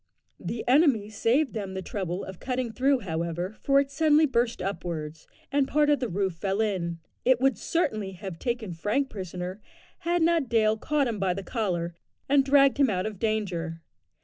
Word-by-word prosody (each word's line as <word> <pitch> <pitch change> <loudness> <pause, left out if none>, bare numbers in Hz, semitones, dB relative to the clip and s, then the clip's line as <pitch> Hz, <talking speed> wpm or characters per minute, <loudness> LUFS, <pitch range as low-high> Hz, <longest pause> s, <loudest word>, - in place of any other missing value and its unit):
The 230 - -5
enemy 250 -6 +4
saved 245 +7 +1
them 200 -4 -4
the 190 - -4
trouble 185 -1 -3
of 190 -2 -8
cutting 250 -2 -2
through, 265 +3 +2
however, 170 +2 -3
for 275 0 +4
it 280 0 -1
suddenly 310 0 +4
burst 240 -4 0
upwards, 165 -5 -4 0.2
and 280 -1 +2
part 295 +1 +3
of 290 - +3
the 245 - -2
roof 190 0 -1
fell 195 +4 -2
in. 185 -6 -1 0.3
It 255 -1 +4
would 270 +1 +3
certainly 215 - -1
have 185 -2 -7
taken 235 -6 -2
Frank 215 +11 -1
prisoner 185 0 -6 0.4
had 345 0 +1
not 325 -6 +2
Dale 220 -2 +3
caught 285 +4 0
him 225 -3 -3
by 185 -2 +1
the 195 - -5
collar, 180 -7 -2 0.3
and 275 0 +4
dragged 275 0 +5
him 275 -3 +5
out 185 -2 -1
of 215 -3 -5
danger. 180 -7 -2
215 Hz, 180 wpm, -27 LUFS, 185-270 Hz, 0.4 s, dragged